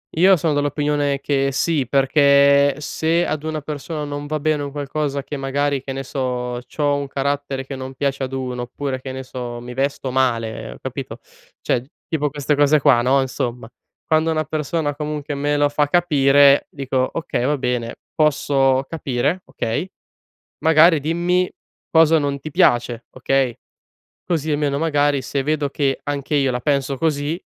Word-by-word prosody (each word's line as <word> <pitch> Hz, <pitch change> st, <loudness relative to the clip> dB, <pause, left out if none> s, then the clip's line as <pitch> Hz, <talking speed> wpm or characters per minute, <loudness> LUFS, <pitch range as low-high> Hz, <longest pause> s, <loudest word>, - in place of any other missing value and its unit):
Io 190 Hz, +4 st, +6 dB
son 160 Hz, -2 st, 0 dB
dell'opinione 145 Hz, -1 st, 0 dB
che 135 Hz, -1 st, 0 dB
sì, 145 Hz, -3 st, 0 dB
perché, 140 Hz, 0 st, +4 dB
se 165 Hz, +3 st, 0 dB
ad 155 Hz, 0 st, -3 dB
una 155 Hz, -1 st, -3 dB
persona 150 Hz, +1 st, -5 dB
non 145 Hz, 0 st, -5 dB
va 155 Hz, -1 st, -3 dB
bene 155 Hz, -1 st, +1 dB
un 140 Hz, -, -5 dB
qualcosa 145 Hz, 0 st, -3 dB
che 145 Hz, -, -6 dB
magari, 140 Hz, 0 st, -1 dB
che 135 Hz, -1 st, -6 dB
ne 135 Hz, 0 st, -4 dB
so, 125 Hz, -2 st, -3 dB
c'ho 145 Hz, -2 st, 0 dB
un 140 Hz, 0 st, -3 dB
carattere 140 Hz, -1 st, -2 dB
che 135 Hz, -1 st, -6 dB
non 130 Hz, 0 st, -7 dB
piace 135 Hz, 0 st, -2 dB
ad 130 Hz, 0 st, -4 dB
1 125 Hz, -2 st, -3 dB
oppure, 130 Hz, +2 st, -4 dB
che 130 Hz, 0 st, -7 dB
ne 130 Hz, 0 st, -6 dB
so, 120 Hz, -2 st, -6 dB
mi 125 Hz, 0 st, -8 dB
vesto 135 Hz, 0 st, -2 dB
male, 115 Hz, -4 st, -1 dB
capito? -, -, -6 dB, 0.4 s
Cioè 120 Hz, -, 0 dB, 0.3 s
tipo 150 Hz, -2 st, 0 dB
queste 145 Hz, 0 st, -1 dB
cose 145 Hz, 0 st, +4 dB
qua 130 Hz, -5 st, +5 dB
no, 135 Hz, +3 st, +3 dB
insomma, 120 Hz, -2 st, -4 dB, 0.4 s
quando 160 Hz, 0 st, +2 dB
una 155 Hz, 0 st, 0 dB
persona 155 Hz, 0 st, -2 dB
comunque 150 Hz, -1 st, -4 dB
me 145 Hz, +1 st, 0 dB
lo 145 Hz, 0 st, +3 dB
fa 145 Hz, 0 st, +1 dB
capire, 145 Hz, -4 st, +4 dB
dico: 130 Hz, -2 st, -1 dB
"Okay, 160 Hz, -6 st, -2 dB
va 145 Hz, +2 st, +1 dB
bene, 125 Hz, -2 st, -2 dB, 0.2 s
posso 135 Hz, -3 st, +2 dB
capire, 145 Hz, +3 st, -1 dB
okay, 145 Hz, +11 st, -3 dB, 0.8 s
magari 160 Hz, +1 st, +6 dB
dimmi 175 Hz, +4 st, +1 dB, 0.4 s
cosa 160 Hz, 0 st, +5 dB
non 140 Hz, -1 st, -2 dB
ti 155 Hz, -, -7 dB
piace, 120 Hz, -8 st, +2 dB
okay," 130 Hz, -1 st, 0 dB, 0.7 s
così 160 Hz, -3 st, -1 dB
almeno, 145 Hz, -1 st, 0 dB
magari, 145 Hz, -3 st, +1 dB
se 135 Hz, +1 st, -2 dB
vedo 150 Hz, -1 st, 0 dB
che 135 Hz, -1 st, 0 dB
anche 145 Hz, +1 st, -2 dB
io 135 Hz, -2 st, +2 dB
la 125 Hz, -, -2 dB
penso 140 Hz, 0 st, 0 dB
così, 155 Hz, +3 st, -1 dB
140 Hz, 165 wpm, -20 LUFS, 135-150 Hz, 0.8 s, Io